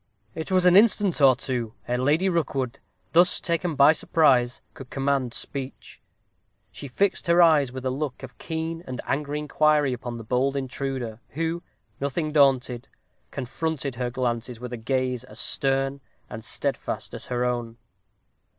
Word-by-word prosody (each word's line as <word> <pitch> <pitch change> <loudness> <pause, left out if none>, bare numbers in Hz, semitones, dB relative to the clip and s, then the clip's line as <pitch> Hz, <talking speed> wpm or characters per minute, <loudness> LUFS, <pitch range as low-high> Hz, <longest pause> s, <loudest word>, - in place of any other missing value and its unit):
It 160 - -5
was 185 -1 +3
an 180 0 +6
instant 205 -5 +4
or 135 -2 +7
two 120 -4 -4
ere 125 - 0
Lady 150 +8 +2
Rookwood, 140 -8 -1 0.3
thus 175 +2 +5
taken 170 -1 -1
by 140 +2 +7
surprise, 135 -6 +2
could 130 -2 -11
command 135 -3 -1
speech. 135 -1 -6 0.7
She 140 - -8
fixed 185 +8 0
her 170 +1 +4
eyes 155 -6 +5
with 130 0 -7
a 130 - +1
look 135 -1 -4
of 125 -4 -10
keen 165 +1 -4
and 125 -1 -5
angry 145 +1 -2
inquiry 150 -2 +2
upon 120 -1 -6
the 115 - -8
bold 130 +5 0
intruder, 130 -4 -4
who, 165 +2 -2 0.4
nothing 150 +3 -2
daunted, 130 -4 +2 0.4
confronted 140 +1 -3
her 120 +1 -3
glances 120 -1 -3
with 125 0 -7
a - - -3
gaze 125 +1 -1
as - - -12
stern 135 0 +1 0.3
and - - -7
steadfast - - -2
as - - -6
her 125 0 -1
own. 120 -2 -3
135 Hz, 155 wpm, -25 LUFS, 125-155 Hz, 0.7 s, or